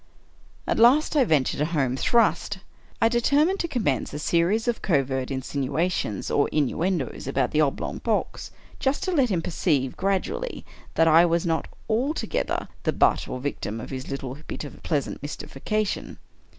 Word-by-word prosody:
At - - 0
last 270 +7 +5
I 285 - +5
ventured 145 - +1
a - - +3
home 130 -3 +1
thrust. 210 - +2 0.4
I 225 - +5
determined 285 +10 +2
to 340 - 0
commence 200 - -1
a 150 - -5
series 175 +9 +1
of 240 -1 0
covert 135 -6 0
insinuations, 140 - -2
or 145 - +2
innuendoes, 155 -1 -1
about 135 - 0
the 155 - +3
oblong 140 -3 -1
box - - -2 0.2
— - - -23
just 270 +2 0
to 375 - -1
let 275 -8 +3
him 175 -5 0
perceive, 150 -7 0
gradually, 195 - -2 0.3
that 165 - +4
I 165 +2 +7
was 170 +1 +1
not 165 -1 0 0.2
altogether 255 +8 -1
the - - 0
butt, - - +3
or 130 - -4
victim, 120 -5 -4
of 115 - -8
his 130 0 -6
little 135 0 -5
bit - - -5
of 145 - -10
pleasant 145 -5 -2
mystification. 190 +8 -3
165 Hz, 165 wpm, -25 LUFS, 135-225 Hz, 0.4 s, I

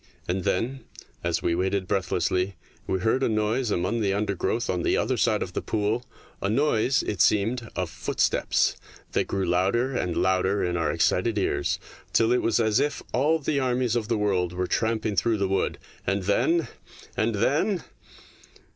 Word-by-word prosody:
And 90 +1 -2
then, 125 +8 0 0.4
as - - -1
we 85 - +1
waited 95 +2 0
breathlessly, 90 0 0 0.3
we 95 - -1
heard 110 +6 +2
a - - +2
noise 110 +3 0
among 100 +5 0
the 100 -2 +1
undergrowth 105 +3 -1
on 90 -1 -1
the - - +2
other - - +1
side - - +2
of - - -8
the - - -2
pool 110 +3 -1 0.4
a 100 - 0
noise, 130 0 +2
it 105 - -2
seemed, 110 +3 +2
of - - -1
footsteps, - - +1 0.4
that - - 0
grew 95 -1 -1
louder 100 +9 +1
and 90 -7 -1
louder 95 +2 +2
in 90 -1 0
our 85 -1 +1
excited 105 +4 +1
ears, 100 - 0 0.4
till 115 0 +4
it 125 - +3
was 115 - +1
as 110 -2 +3
if 145 - -1
all 150 +6 +3
the 150 -1 -1
armies 125 -2 +1
of 115 -3 -1
the 115 -1 +1
world 95 -4 0
were 90 +1 -1
tramping 110 +1 0
through 110 +4 +2
the 100 -1 0
wood. 95 +1 0 0.3
And 100 0 0
then... 155 - +2 0.5
and 110 0 +1
then 155 - +1
105 Hz, 175 wpm, -26 LUFS, 95-120 Hz, 0.5 s, till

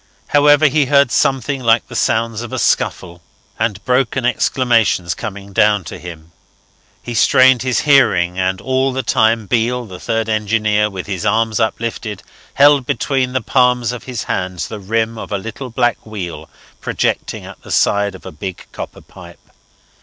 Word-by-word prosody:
However, 145 +1 +5
he 145 -1 +3
heard 140 -2 +4
something 135 0 0
like 115 -1 +2
the - - -10
sounds 115 0 0
of 120 - -7
a - - -3
scuffle 85 -1 -1 0.4
and 110 -3 -2
broken 130 0 +1
exclamations 115 -8 +1
coming 100 -1 -8
down 105 0 +3
to - - -8
him. 85 -2 -10 0.7
He 120 - -6
strained 130 +2 +5
his 130 -1 0
hearing; 100 -11 +3
and 95 0 0
all 130 +2 0
the 130 0 -2
time 110 -1 +2
Beale, 120 +3 0
the 95 -4 -10
third 115 -1 -2
engineer, 105 -1 +1
with 95 -3 -6
his 95 -4 -4
arms 115 0 +1
uplifted, 110 -2 -3 0.3
held 140 -2 +5
between 130 0 -1
the 130 - 0
palms 125 +1 +2
of 125 - -8
his 125 -4 -4
hands 90 -1 -3
the 110 - -6
rim 110 +3 -2
of - - -8
a 100 - 0
little 115 +6 -7
black 120 0 0
wheel 100 -6 -7 0.3
projecting - - -2
at - - -12
the - - -14
side 100 -1 +1
of 95 - -14
a - - -7
big 95 +4 -7
copper - - -8
pipe. - - -16
115 Hz, 170 wpm, -17 LUFS, 100-125 Hz, 0.7 s, However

